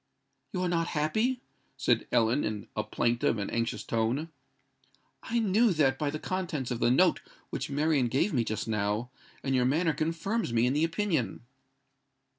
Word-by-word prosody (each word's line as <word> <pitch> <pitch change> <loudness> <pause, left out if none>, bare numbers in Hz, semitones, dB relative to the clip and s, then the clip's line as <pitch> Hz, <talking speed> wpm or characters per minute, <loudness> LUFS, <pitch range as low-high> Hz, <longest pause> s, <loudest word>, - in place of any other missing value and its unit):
"You 180 -1 -2
are - - +1
not 170 -1 0
happy?" 220 - +1 0.4
said - - +1
Ellen, 115 +5 +3
in 105 -2 -3
a - - 0
plaintive 120 -1 +1
and 100 - -3
anxious 115 0 -1
tone. 115 +8 -1 0.9
"I 235 - -2
knew 220 0 +3
that 135 -5 +2
by 150 - 0
the 155 - -3
contents 165 -7 -3
of 120 - -2
the - - +3
note 175 +9 +4 0.3
which - - -3
Marian 145 -2 +2
gave 140 - +1
me 120 -4 +2
just 110 0 -3
now; 105 +2 -1 0.3
and 135 - 0
your 125 -1 +3
manner 160 +5 +2
confirms 165 - -1
me 115 +1 +3
in 125 - +2
the 150 +2 +2
opinion." 165 - -1
145 Hz, 170 wpm, -29 LUFS, 120-175 Hz, 0.9 s, note